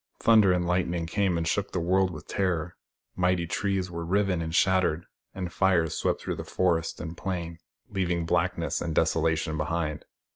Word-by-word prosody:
Thunder 110 -4 +5
and 90 -1 +1
lightning 85 -1 0
came 95 0 0
and 80 0 -1
shook 100 +3 -1
the 90 - 0
world 95 +2 +2
with 80 -4 -9
terror: 90 -3 -1 0.4
mighty 90 -1 +1
trees 95 +1 -1
were 85 0 -4
riven 95 0 +1
and 80 0 -3
shattered, 95 -3 +2 0.3
and 90 -2 -4
fires 90 -5 +2
swept - - 0
through - - -4
forest 85 -3 0
and 85 0 -6
plain, 85 -3 -4 0.3
leaving 90 -3 -1
blackness - - 0
and 80 -2 -3
desolation 80 -1 +1
behind. 75 0 -2
85 Hz, 160 wpm, -27 LUFS, 80-95 Hz, 0.4 s, Thunder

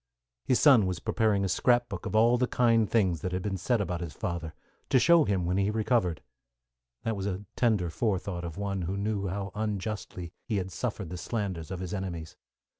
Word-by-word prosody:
His 125 - +3
son 120 -10 +6
was 90 -2 -2
preparing 105 0 +1
a - - 0
scrap 120 +6 +3
book 100 -5 -5
of - - -3
all 115 +2 +5
the 125 0 +1
kind 115 -4 +3
things 95 -9 +2
that 90 - -2
had 90 0 -2
been 100 -2 -1
said 115 +6 0
about 90 -3 -2
his 85 -3 -5
father, 85 -3 -4 0.3
to - - +5
show 170 +3 +6
him 95 -3 0
when 90 +2 0
he 100 +1 +2
recovered. 105 - +1 0.8
That 115 - -1
was 100 0 -3
a 100 +1 -4
tender 105 -8 +2
forethought 95 -2 -1
of 85 +1 -6
one 100 -2 -2
who 90 +3 -2
knew 100 -1 -1
how 100 +1 -3
unjustly 105 -4 -4
he 110 -4 0
had 95 0 -3
suffered 100 -5 -4
the 90 - -4
slanders 95 -6 -3
of 95 -1 -5
his 90 0 -4
enemies. 90 -5 -5
100 Hz, 205 wpm, -29 LUFS, 90-110 Hz, 0.8 s, son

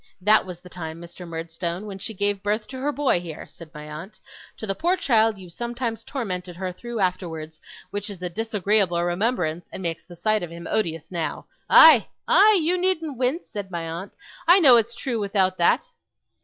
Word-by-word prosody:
That 210 +1 +4
was 180 -2 -7
the 180 - -13
time, 165 -3 -7
Mr. 170 +1 -10
Murdstone, 170 +3 -4
when 195 -2 -7
she 220 +3 -5
gave 205 0 0
birth 210 +2 -1
to 260 - -7
her 285 +3 0
boy 285 -10 +1
here,' 165 -3 -8
said 165 -2 -13
my 150 -1 -9
aunt; 165 +8 -9 0.4
'to - - -5
the 195 - -1
poor 350 - +1
child 225 - +3
you 185 -2 -11
sometimes 235 +2 -4
tormented 185 -9 -4
her 185 +1 -4
through 235 +5 -6
afterwards, 165 -4 -3 0.3
which 205 +1 -3
is 200 -3 -8
a - - 0
disagreeable 200 -3 +1
remembrance 175 -3 -1
and 190 - -7
makes 165 -2 -3
the 175 +1 -13
sight 215 +4 +1
of 175 - -5
him 170 0 -9
odious 165 -6 -2
now. 170 -3 -3 0.2
Aye, - - +8 0.2
aye! 420 -1 +6
you 355 +3 +1
needn't 325 -8 0
wince!' 265 +7 0
said 205 -4 -6
my 170 -2 -4
aunt. 170 +5 -6 0.3
'I 355 +3 +8
know 265 -6 +8
it's 235 0 +2
true 240 -2 -3
without 195 -2 +1
that. 175 - +3
195 Hz, 195 wpm, -24 LUFS, 170-230 Hz, 0.4 s, Aye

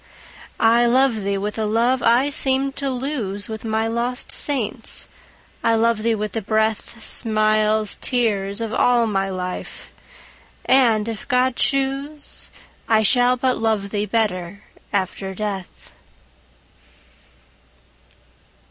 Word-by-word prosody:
I 235 +1 +4
love 255 -1 +3
thee 200 0 -1
with 210 +2 -4
a 220 - 0
love 235 +4 +1
I 240 +5 +3
seemed 270 -1 0
to 280 -1 -1
lose 245 -7 -3
With 220 -1 -6
my 220 0 -1
lost 240 +2 -3
saints,—I 230 -2 -2
love 225 -1 +1
thee 230 0 +1
with 210 -1 -4
the 225 - -3
breath, 220 +2 -1
Smiles, 215 -1 +2
tears, 210 -4 -1
of 225 -1 -3
all 240 0 +3
my 195 -3 -1
life!—and, 215 +5 -2
if 225 -2 -6
God 255 -1 +2
choose, 275 +3 -2 0.4
I 220 -1 +4
shall 245 +3 +4
but 255 0 0
love 215 -3 -1
thee 210 0 -1
better 200 -3 -2 0.3
after 190 -1 -2
death. 200 -2 -6
225 Hz, 115 wpm, -21 LUFS, 210-250 Hz, 0.4 s, I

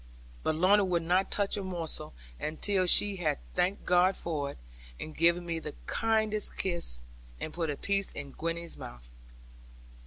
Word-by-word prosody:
But 155 - 0
Lorna 195 +5 +5
would 175 -3 +1
not 180 +3 +2
touch 200 0 +1
a - - -2
morsel 175 - -5 0.2
until 185 +4 +1
she 200 +2 +6
had 155 -5 0 0.2
thanked 180 +3 0
God 180 +1 +4
for 150 -4 -2
it, - - -9 0.4
and 155 - -7
given 170 +1 +3
me 165 -1 -2
the - - -6
kindest 220 - 0
kiss, 170 - -2 0.4
and 155 - -5
put 165 -2 -2
a 145 - -2
piece 200 -1 0
in 140 -1 -7
Gwenny's 165 +2 -4
mouth. - - -10
175 Hz, 160 wpm, -30 LUFS, 155-195 Hz, 0.4 s, she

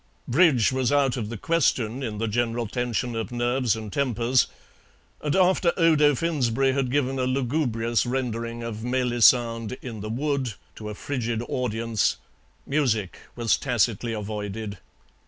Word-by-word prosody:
Bridge 130 -4 +4
was 130 0 0
out 140 -3 +3
of 110 -5 -4
the 115 - -5
question 130 -4 +1
in 110 -5 -4
the 115 +2 -1
general 115 +1 0
tension 120 +1 -2
of 115 +2 -3
nerves 120 0 +1
and 110 -2 -7
tempers, 125 -2 +2 0.7
and 150 -1 -1
after 185 -2 +3
Odo 155 -4 +4
Finsberry 135 -4 +1
had 135 -2 0
given 135 0 0
a 130 - +1
lugubrious 125 -3 0
rendering 120 -2 -3
of 110 -1 -5
"Melisande 120 -1 +3
in 115 -5 -7
the 110 - -5
Wood" 130 -2 -1 0.2
to 105 -1 -6
a 105 - -6
frigid 120 -3 -3
audience, 115 -3 0 0.5
music 120 -10 0 0.2
was 115 -2 +2
tacitly 120 -2 0
avoided. 105 -1 -5
120 Hz, 140 wpm, -25 LUFS, 115-135 Hz, 0.7 s, Bridge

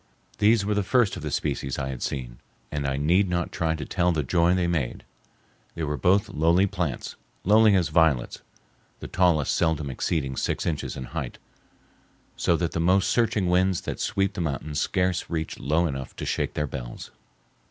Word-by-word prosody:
These 105 -1 +4
were 105 - +1
the 105 - +1
first 115 +1 +2
of - - -7
the - - -4
species 70 -1 -2
I 65 0 -3
had 65 -2 -6
seen, 60 -3 -4 0.3
and 75 -2 -2
I 70 0 -1
need 90 +7 +2
not 85 0 -1
try 80 -3 0
to 75 - -5
tell 90 -1 +1
the 80 -3 0
joy 85 +5 +3
they 90 -1 +1
made. 80 -7 -2 0.7
They 80 - -3
are 75 -1 -1
both 90 +9 +3
lowly 85 +5 +3
plants,—lowly 100 - +1
as 90 -4 +2
violets,—the 80 -6 -2
tallest 85 -6 +2
seldom 80 -4 0
exceeding 70 0 -2
six - - -1
inches 80 -4 -2
in 65 - -5
height, 70 -1 -5 1.0
so 85 - +1
that 85 -1 -1
the - - -3
most 90 +3 +3
searching 110 -5 +2
winds 90 +1 +2
that - - -5
sweep 100 0 0
the 90 - -4
mountains 75 0 -2
scarce 90 -1 0
reach 80 -2 -3
low 80 +5 +1
enough 70 -4 -4
to - - -5
shake - - -2
their 75 - 0
bells. 65 -4 -7
85 Hz, 180 wpm, -25 LUFS, 75-90 Hz, 1.0 s, These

